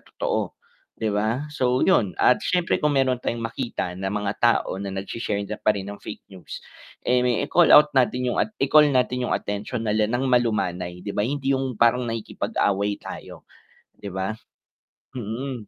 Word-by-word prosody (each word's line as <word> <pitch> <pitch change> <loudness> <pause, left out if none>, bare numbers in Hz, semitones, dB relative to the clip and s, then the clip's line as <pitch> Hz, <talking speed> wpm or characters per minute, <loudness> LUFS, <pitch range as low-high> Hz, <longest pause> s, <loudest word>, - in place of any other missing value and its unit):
totoo, - - -3 0.4
'di 110 -2 -1
ba? 110 +7 0
So 125 -2 +1
yun, 105 - +2
at 125 - +4
syempre 180 -2 0
kung 150 -2 +1
meron 130 -2 +2
tayong 115 -2 -3
makita 115 -5 -3
ng 95 +2 -4
mga 105 0 -2
tao 120 -4 +2
na 100 - -4
nag-sh-share 100 +1 -3
na 105 +1 -6
pa 105 -1 +2
rin 95 - -4
ng 100 - -8
fake 105 - -9
news, 95 - -10 0.4
eh, 125 0 +3 0.2
i-call 170 +2 +4
out 150 0 +6
natin 125 -1 +1
yung - - -3
at - - +1
i-call 150 -1 +5
natin 125 -1 0
yung - - +1
atensyon 105 +3 -4
nila 105 0 +1
ng 125 +3 -1
malumanay 90 -7 0
'di 100 - -4
ba, - - -1
hindi 135 +1 -1
yung 130 -3 -3
parang 120 +1 +4
nakikipag-away 100 -2 -1
tayo, - - -9 0.5
'di 100 - -7
ba? 95 +3 -2 0.8
Mm, 120 0 -5
115 Hz, 170 wpm, -24 LUFS, 100-125 Hz, 0.8 s, out